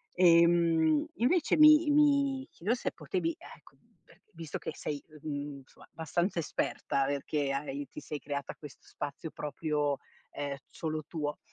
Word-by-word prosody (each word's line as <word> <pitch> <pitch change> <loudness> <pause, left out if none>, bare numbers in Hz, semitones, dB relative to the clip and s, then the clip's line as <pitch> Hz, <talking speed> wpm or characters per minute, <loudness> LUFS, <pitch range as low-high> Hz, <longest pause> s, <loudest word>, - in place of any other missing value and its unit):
Ehm, 170 -3 +5
invece, 300 - +2
mi 305 0 +8
mi 280 -2 +3
chiedo 205 +8 -1
se - - -3
potevi, 360 -4 -2
e 330 - -14
cu - - -20 0.3
e - - -21
visto 160 -2 -6
che - - -5
sei 145 -2 -4 0.2
uhm, 155 - -4
mhmm, 145 -1 -5
cioè, - - -18
abbastanza 170 +3 -1
esperta, 140 -3 -1
perché 140 0 -1
hai 140 0 -4
ti - - -9
sei 150 - -5
creata 140 -1 -4
questo 150 -3 -13
spazio 145 +2 -6
proprio, 150 -1 -1 0.3
ehm, 140 -1 -4
solo 155 -1 -4
tuo, 150 -3 -3
155 Hz, 150 wpm, -31 LUFS, 145-205 Hz, 0.3 s, mi